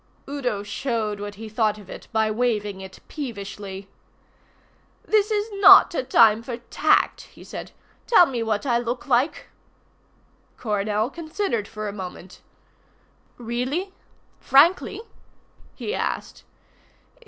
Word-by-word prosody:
Udo 255 -8 -3
showed 215 -1 -3
what 205 0 -6
he 220 +2 -8
thought 215 -1 0
of 205 -3 -13
it - - -10
by 220 -1 +1
waving 210 -4 -1
it 190 0 -11
peevishly. 200 -7 -7 1.2
"This 425 -1 +2
is 420 -1 0
not - - +9
a - - 0
time 225 -3 +5
for 235 0 -6
tact," 240 - +1
he - - -14
said. - - -8 0.4
"Tell 395 -7 +7
me 250 -6 -3
what 220 +1 -1
I 240 -3 +2
look 240 +3 -4
like." 265 +2 0 1.1
Coronel 210 +1 -1
considered 315 - -3
for 215 -1 -6
a 200 - -5
moment. 185 -1 -9 1.0
"Really 255 - -3 0.5
frankly?" 345 +9 +3 0.7
he 430 - -4
asked. - - -4
230 Hz, 120 wpm, -23 LUFS, 210-275 Hz, 1.2 s, not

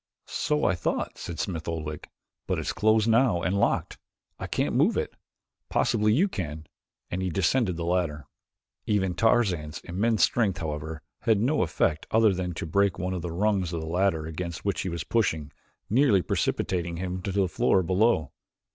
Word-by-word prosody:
"So 150 0 0
I - - +3
thought," 90 0 -2
said 85 - -6
Smith 80 -4 -3
Oldwick, 75 -2 -5 0.4
"but - - 0
it's - - -2
closed 110 0 +3
now 115 -6 +3
and 95 - 0
locked. 100 - 0 0.4
I - - -4
cannot - - -1
move - - +3
it. - - -2 0.6
Possibly 105 0 +2
you 160 - +4
can," 80 - -5 0.5
and 90 - -2
he 95 - -1
descended 95 +2 +1
the 85 - -3
ladder. 85 -5 -1 0.6
Even 95 -3 +1
Tarzan's 95 -8 +1
immense 105 +5 +1
strength, 105 -7 +2
however, 80 0 -5 0.2
had 110 -3 +2
no 135 +8 +2
effect 80 -2 0
other 110 -2 +4
than 90 -2 -3
to - - -4
break 100 +4 +2
one 90 +1 -2
of 90 - -3
the 85 - -4
rungs 95 -1 0
of 85 - -2
the - - -5
ladder 85 -1 +1
against 85 +2 -5
which 100 -2 0
he 95 - -3
was 85 -1 -4
pushing, 80 -10 0 0.4
nearly 110 -5 +4
precipitating 85 -2 -1
him 90 +1 -3
to 100 - -3
the 95 0 +2
floor 95 +1 +2
below. 95 - +2
90 Hz, 175 wpm, -27 LUFS, 85-105 Hz, 0.6 s, you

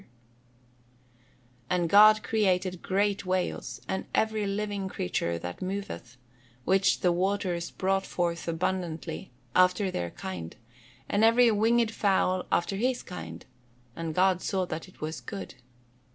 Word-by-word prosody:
[Verse: - - -22 1.6
"And 180 -2 +1
God 215 +3 +7
created 185 -4 +1
great 200 +1 0
whales, 185 -1 -2
and 190 - -3
every 220 -2 +1
living 200 -1 -2
creature 85 - -2
that 90 +1 -7
moveth, 180 - -5 0.5
which 190 +1 +3
the 180 - +4
waters 180 -1 -1
brought 195 0 0
forth 170 -1 -2
abundantly, 170 -1 -3 0.3
after 185 +2 +4
their 85 - -2
kind, 85 -2 -7 0.5
and 205 +2 +1
every 230 +1 +6
winged 225 +2 +3
fowl 190 -4 +1
after 195 +3 +1
his 250 +3 0
kind: 80 -1 -8 0.5
and 165 -2 -4
God 185 -1 +3
saw 190 -1 0
that 160 -1 -5
it 185 - -19
was 155 +1 -4
good." 200 -3 -7
185 Hz, 130 wpm, -28 LUFS, 170-205 Hz, 1.6 s, God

